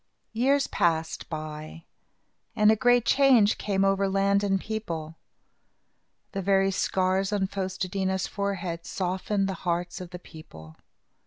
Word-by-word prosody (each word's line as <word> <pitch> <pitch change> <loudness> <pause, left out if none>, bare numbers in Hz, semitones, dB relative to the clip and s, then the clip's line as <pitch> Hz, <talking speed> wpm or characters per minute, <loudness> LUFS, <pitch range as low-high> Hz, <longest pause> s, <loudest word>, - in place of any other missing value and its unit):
Years 275 +5 +2
passed 160 -1 -1
by 155 0 -7 0.7
and 210 -1 +5
a - - +4
great 245 +1 +3
change 255 -7 +4
came 195 -1 0
over 195 0 +2
land 200 +1 +2
and 195 -1 +1
people. 170 -8 -5 1.2
The 195 - -3
very 195 0 +2
scars 190 +1 0
on 200 -2 +1
Fos 190 -1 -4
te 185 - -2
dí 190 +1 -2
na's 190 0 0
forehead 190 -4 -4
softened 190 +2 -1
the 195 - -2
hearts 175 +1 -2
of 180 - -8
the 180 - -7
people. 80 - -13
195 Hz, 145 wpm, -27 LUFS, 175-200 Hz, 1.2 s, and